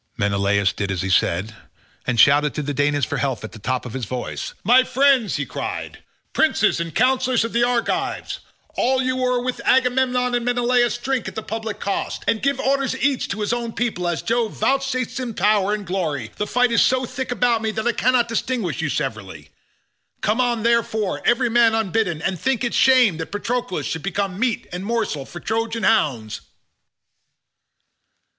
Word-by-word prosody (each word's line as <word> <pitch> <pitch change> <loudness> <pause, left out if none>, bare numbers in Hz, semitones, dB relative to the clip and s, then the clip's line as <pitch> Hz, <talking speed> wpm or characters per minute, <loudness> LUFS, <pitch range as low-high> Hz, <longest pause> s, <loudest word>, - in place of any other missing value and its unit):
Menelaus 100 -1 +1
did 100 -1 -3
as 95 -2 -2
he 95 - -2
said, 95 +4 +1 0.5
and 125 -3 0
shouted 145 +3 +5
to 150 - -2
the 145 +1 -3
Danaans 145 -1 +1
for - - -3
help 130 -6 -2
at 110 - -7
the 110 - -11
top 130 +4 -2
of 120 - -7
his 130 -3 -3
voice. 125 +3 -5
"My 245 +6 +6
friends," 260 -5 +2
he 145 - -2
cried, - - -5 0.3
"princes - - +2
and 165 -2 -4
counsellors 255 +2 +2
of 230 - -6
the 235 +1 +2
Argives, 240 -1 -1 0.3
all 260 +1 +1
you 255 0 0
who 250 -1 0
with 255 0 -3
Agamemnon 250 -1 +2
and 240 -1 0
Menelaus 245 0 +2
drink 260 0 -2
at - - -7
the 220 - -4
public 220 -1 -5
cost, 200 - -3
and 220 - +1
give 275 -1 0
orders 270 -1 0
each 270 -1 +1
to 205 +2 -4
his 210 +3 0
own 235 -1 -3
people 215 -7 -2
as 175 -2 -2
Jove 230 -1 0
vouchsafes 265 -2 -1
him 240 -4 -4
power 205 +1 +2
and 210 -1 -2
glory, 160 - -3
the 210 - -2
fight 250 0 +2
is 230 - +4
so 255 0 +2
thick 260 +1 -5
about 240 -1 +2
me 220 - -1
that 220 +1 -3
I 240 - +3
cannot 245 0 +2
distinguish 230 -7 -2
you 155 - -1
severally; 110 -10 -4 0.7
come 215 +5 +1
on, 240 -3 0
therefore, 225 -3 0
every 240 0 +3
man 230 -1 +4
unbidden, 195 -6 -1
and 190 -3 -1
think 260 -2 0
it 240 - -1
shame 250 -10 +5
that 160 - -6
Patroclus 235 0 -2
should 160 - -3
become 195 0 -2
meat 235 -2 0
and 180 +1 -4
morsel 210 -11 -2
for 175 - -9
Trojan 225 +2 -2
hounds." 130 - +1
225 Hz, 185 wpm, -21 LUFS, 160-250 Hz, 0.7 s, My